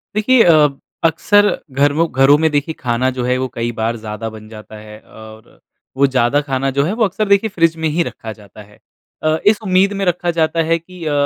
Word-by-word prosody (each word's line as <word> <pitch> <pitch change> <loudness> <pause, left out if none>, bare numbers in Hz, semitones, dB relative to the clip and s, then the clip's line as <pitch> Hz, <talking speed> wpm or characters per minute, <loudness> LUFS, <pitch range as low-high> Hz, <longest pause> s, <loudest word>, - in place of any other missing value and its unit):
देखिए 230 +3 +4
अ, 155 -3 +5 0.4
अक्सर 205 +6 +3 0.3
घरमो 145 +4 +2
घरों 135 +1 +4
में 160 - +3
देखिए 145 +2 -1
खाना 125 +1 0
जो 125 - -2
है 125 0 0
वो 130 - -2
कई 115 0 -3
बार 115 +1 -1
ज़्यादा 105 +1 -5
बन 110 0 -12
जाता 110 0 -12
है। 105 0 -12
और 110 0 -15 0.5
वो 140 +1 +4
ज़्यादा 130 +2 +1
खाना 135 -1 -2
जो 140 - +3
है 180 - -2
वो - - +3
अक्सर 210 +2 -2
देखिए 200 +2 +3
फ्रिज 165 -1 +2
में - - +2
ही 170 - +2
रखा 110 - -8
जाता 105 0 -15
है। 105 - -22 0.4
अ, 155 0 +1
इस 210 0 +5
उम्मीद 190 0 +2
में 195 - -1
रखा 175 0 0
जाता 160 +1 0
है 165 - +3
कि 175 +1 -13
अ, 150 - -1
145 Hz, 220 wpm, -17 LUFS, 120-175 Hz, 0.5 s, अ